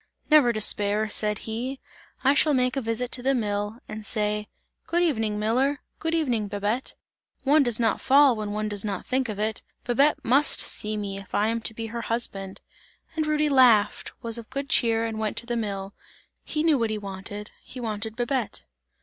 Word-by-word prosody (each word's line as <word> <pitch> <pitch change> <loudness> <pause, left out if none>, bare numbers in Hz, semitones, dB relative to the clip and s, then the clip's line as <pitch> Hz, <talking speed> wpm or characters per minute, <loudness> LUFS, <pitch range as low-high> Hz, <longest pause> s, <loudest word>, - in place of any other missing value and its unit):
"Never 295 -6 +6
despair," 210 -1 +1
said 210 0 +1
he. 245 +5 -4 0.4
"I 275 +1 +5
shall 290 0 +3
make 250 0 +1
a 270 - -1
visit 230 +1 -2
to 250 - -2
the 270 +2 +2
mill, 205 -1 -2
and 215 0 -7
say: 210 0 -2 0.4
Good 345 +1 +1
evening 220 -10 0
miller, 255 +7 +1 0.2
good 325 +1 -1
evening 245 -10 0
Babette! 205 +5 -2 0.5
One 295 +3 +5
does 240 -4 +1
not 225 -2 +1
fall 275 -1 +5
when 210 -1 -4
one 215 +1 -2
does 205 -2 -2
not 205 -2 -4
think 260 -1 0
of 210 - -4
it! 215 0 -2 0.2
Babette 275 +5 +2
must 275 +5 +4
see 215 0 0
me, 200 -1 -4
if 195 - -8
I 210 +2 +2
am 230 0 -1
to 225 - -2
be 225 - -4
her 235 - -3
husband!" 200 -5 -2 0.5
And 310 -1 -1
Rudy 305 0 +2
laughed, 250 -7 +4
was 230 0 -1
of 230 - -12
good 275 0 -4
cheer 230 -1 +2
and 220 -1 -4
went 215 -1 -2
to - - -1
the 240 0 -2
mill; 200 -3 -4 0.5
he 305 0 -2
knew 315 -5 +3
what 230 -1 0
he 215 - -2
wanted, 205 +1 -7
he 255 - -10
wanted 220 -1 -3
Babette. 245 -1 -2
225 Hz, 195 wpm, -25 LUFS, 210-260 Hz, 0.5 s, Never